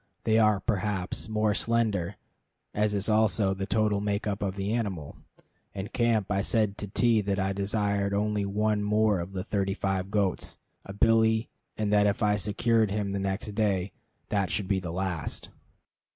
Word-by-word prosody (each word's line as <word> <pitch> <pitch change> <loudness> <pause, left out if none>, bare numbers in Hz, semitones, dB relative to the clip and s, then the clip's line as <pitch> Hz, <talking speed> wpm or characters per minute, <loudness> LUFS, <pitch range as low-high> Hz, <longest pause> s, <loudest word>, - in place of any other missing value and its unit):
They 110 0 +3
are, 105 -2 +4
perhaps, 100 -1 -2
more 110 -1 +1
slender, 110 -7 0 0.6
as 105 0 +1
is 100 0 -1
also 105 -2 +2
the 95 0 -4
total 105 -1 +1
makeup 100 0 -2
of 95 -2 -2
the 100 +2 -2
animal. 95 -11 -3 0.6
In 100 +1 -4
camp 115 -4 +1
I 100 -1 +2
said 105 -1 +1
to 105 - -4
T 115 +2 +2
that 100 -1 -1
I 95 0 0
desired 100 0 0
only 105 0 0
one 105 +1 0
more 105 -1 +2
of 85 +3 -6
those 95 +1 -4
thirty 100 -2 -1
five 95 -2 -1
goats, 100 -3 -1 0.3
a 100 - -7
billy; 110 +2 +3 0.3
and 105 -1 0
that 105 0 +5
if 100 +3 0
I 105 0 +3
secured 110 +2 +1
him 100 0 -2
the 100 - -2
next 95 +2 -2
day, 100 -3 0 0.4
that 100 -4 0
should 100 +3 -1
be 95 -1 +1
the 90 -2 -6
last. 90 -4 -3
100 Hz, 175 wpm, -28 LUFS, 95-110 Hz, 0.6 s, that